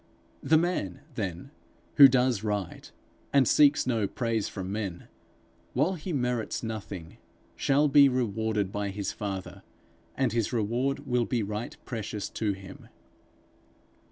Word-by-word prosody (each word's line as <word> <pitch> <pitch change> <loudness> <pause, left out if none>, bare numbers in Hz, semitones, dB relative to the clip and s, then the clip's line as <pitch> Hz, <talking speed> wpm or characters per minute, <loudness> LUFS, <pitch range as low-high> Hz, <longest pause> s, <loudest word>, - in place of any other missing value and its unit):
The 160 - +4
man, 155 - -1
then, 105 +3 -5 0.5
who 140 -2 +12
does 125 -4 +2
right, 105 -4 -3 0.4
and 135 -3 +4
seeks 145 -1 +5
no 115 -5 +1
praise 115 -3 -1
from 95 -1 -5
men, 100 -4 -4 0.7
while 150 +9 +2
he 180 +1 -6
merits 125 -7 -1
nothing, 100 -7 -6 0.4
shall 145 +2 +3
be 140 0 +7
rewarded 110 -5 -1
by 105 0 -2
his 100 0 -3
Father, 95 -3 -5 0.6
and 130 -3 +1
his 115 -3 0
reward 120 +4 -1
will 125 -1 +1
be 120 -2 -1
right 105 +3 -5
precious 110 -4 -4
to 105 -2 -1
him. 95 0 -11
110 Hz, 130 wpm, -28 LUFS, 100-130 Hz, 0.7 s, who